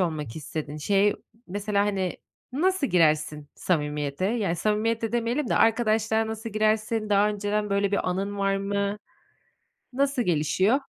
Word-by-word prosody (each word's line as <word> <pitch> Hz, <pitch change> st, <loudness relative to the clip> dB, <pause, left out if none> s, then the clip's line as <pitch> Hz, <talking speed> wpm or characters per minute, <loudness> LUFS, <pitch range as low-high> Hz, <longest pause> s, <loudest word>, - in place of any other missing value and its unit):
olmak 155 Hz, -8 st, -2 dB
istedin. 150 Hz, -1 st, -5 dB
Şey, 200 Hz, +6 st, +2 dB, 0.3 s
mesela, 205 Hz, +2 st, 0 dB
hani, 190 Hz, -3 st, -1 dB, 0.4 s
nasıl 360 Hz, +3 st, +1 dB
girersin 155 Hz, -, +2 dB
samimiyete? 150 Hz, -1 st, -1 dB
Yani, 205 Hz, -6 st, 0 dB
samimiyet 220 Hz, +4 st, 0 dB
de 225 Hz, 0 st, -2 dB
demeyelim 240 Hz, +3 st, 0 dB
de -, -, +1 dB
arkadaşlığa 220 Hz, -1 st, +2 dB
nasıl 220 Hz, +1 st, -5 dB
girersin, 215 Hz, 0 st, 0 dB
daha 205 Hz, +1 st, +4 dB
önceden 210 Hz, 0 st, -1 dB
böyle 200 Hz, 0 st, +1 dB
bir 200 Hz, -, +1 dB
anın 200 Hz, +2 st, -3 dB
var 195 Hz, 0 st, +1 dB
mı, 200 Hz, +1 st, -1 dB, 0.9 s
nasıl 275 Hz, 0 st, +1 dB
gelişiyor? 185 Hz, -, +2 dB
205 Hz, 135 wpm, -26 LUFS, 180-220 Hz, 0.9 s, daha